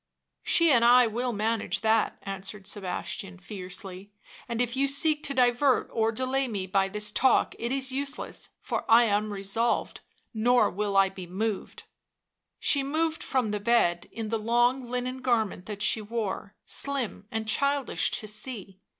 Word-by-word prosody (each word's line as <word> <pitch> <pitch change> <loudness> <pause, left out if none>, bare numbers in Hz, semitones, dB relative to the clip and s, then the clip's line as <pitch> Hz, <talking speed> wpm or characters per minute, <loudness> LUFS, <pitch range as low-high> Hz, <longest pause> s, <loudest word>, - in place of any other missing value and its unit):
" - - -57
She 335 -2 +4
and 240 -3 +5
I 245 +1 +7
will 240 +3 -2
manage 210 -3 -1
that," 220 0 +2
answered 195 0 -6
Sebastian 190 -1 -5
fiercely; 190 +1 -8 0.4
"and 235 -1 -3
if 245 0 0
you 275 +1 +2
seek 300 +2 +2
to 275 - -2
divert 250 +2 +3
or 225 -1 +2
delay 260 +3 -1
me 200 -5 -3
by 195 +1 +1
this 210 +1 -3
talk 260 +4 +3
it 235 +1 -2
is 270 0 -1
useless, 280 +2 -4
for - - -3
I 230 +1 +7
am 210 -1 +1
resolved, 200 +4 -1 0.3
nor 240 +2 +3
will 200 0 -1
I 195 0 +5
be 190 -2 -9
moved." 200 +3 -3 0.8
She 280 - +3
moved 315 +3 -1
from 250 -5 0
the 210 - -2
bed, 200 -6 +2
in 225 -1 -5
the 225 0 -1
long 240 +3 +1
linen 250 +1 -3
garment 220 -7 0
that 210 -1 -4
she 220 - +3
wore, 210 -2 -4
slim 265 -7 -1
and 220 0 -3
childish 280 +3 +1
to 215 - -3
see. 210 -3 -7
225 Hz, 165 wpm, -27 LUFS, 200-255 Hz, 0.8 s, I